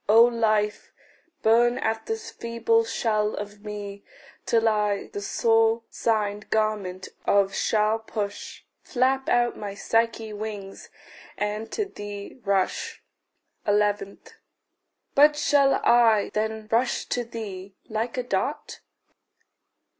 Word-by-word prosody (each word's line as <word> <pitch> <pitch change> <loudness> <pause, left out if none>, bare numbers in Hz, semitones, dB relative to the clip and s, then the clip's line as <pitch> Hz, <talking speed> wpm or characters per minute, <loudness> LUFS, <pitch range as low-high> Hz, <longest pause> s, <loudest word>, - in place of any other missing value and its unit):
O 225 +2 +8
Life, 215 -3 +1 0.5
burn 240 +2 +4
at 225 -3 -2
this 445 0 -4
feeble 230 -1 +1
shell 215 -2 0
of 205 0 -7
me, 205 -1 -7 0.4
Till 230 -1 +3
I 210 -2 0
the 205 - -4
sore 225 +2 +2
singed 210 -2 -1
garment 205 -4 -1 0.2
off 200 -1 +3
shall 215 0 +1
push, 210 -2 -5 0.2
Flap 265 +1 0
out 240 0 +2
my 200 -1 -6
Psyche 225 0 0
wings, 205 -2 -7 0.5
and 210 +2 -3
to 425 - 0
thee 205 - -8
rush. 195 -2 -1 0.6
11. 205 -1 +1 0.9
But 295 +1 +6
shall 285 -2 +3
I 230 -3 +4
then 220 0 -2
rush 240 +2 +1
to 245 - 0
thee 200 -5 -7
like 225 +3 -3
a 250 - 0
dart? 245 - -3
220 Hz, 115 wpm, -25 LUFS, 205-230 Hz, 0.9 s, O